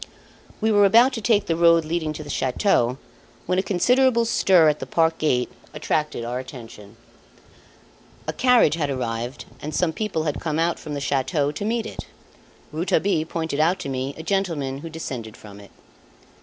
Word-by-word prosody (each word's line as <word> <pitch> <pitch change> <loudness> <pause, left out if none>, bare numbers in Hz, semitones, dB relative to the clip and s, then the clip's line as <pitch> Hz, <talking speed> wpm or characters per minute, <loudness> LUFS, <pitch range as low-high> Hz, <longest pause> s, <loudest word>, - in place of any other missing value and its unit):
We 220 +1 +2
were 205 -1 +5
about 235 +7 +5
to 225 - -4
take 215 -2 +2
the 165 - 0
road 170 -1 +4
leading 160 -1 -2
to 155 - -7
the 145 - -11
chateau, 130 - +1 0.5
when 185 0 +1
a - - +3
considerable 235 +5 +2
stir 185 -7 +4
at 150 0 +2
the - - -6
park 165 -1 +1
gate 125 -5 +1 0.2
attracted 150 -6 -2
our 120 +1 -3
attention. 115 -5 -11 1.3
A - - -2
carriage 250 - +4
had 155 -3 -1
arrived 120 -1 -4 0.2
and 150 0 -5
some 170 -3 +1
people 210 -6 -2
had 150 -2 -3
come 155 -2 -2 0.2
from 150 - -7
the - - -3
chateau 140 +2 0
to 175 +7 -5
meet 230 0 -1
it. - - -8 0.6
Rouletabille 165 +1 0
pointed 160 -3 -3
out 170 +4 +3
to - - -5
me 135 +1 -3
a 160 - -7
gentleman 165 -8 -1
who 165 - -8
descended 125 -9 -7
from 100 -1 -13
it. 100 - -14
155 Hz, 175 wpm, -23 LUFS, 135-190 Hz, 1.3 s, were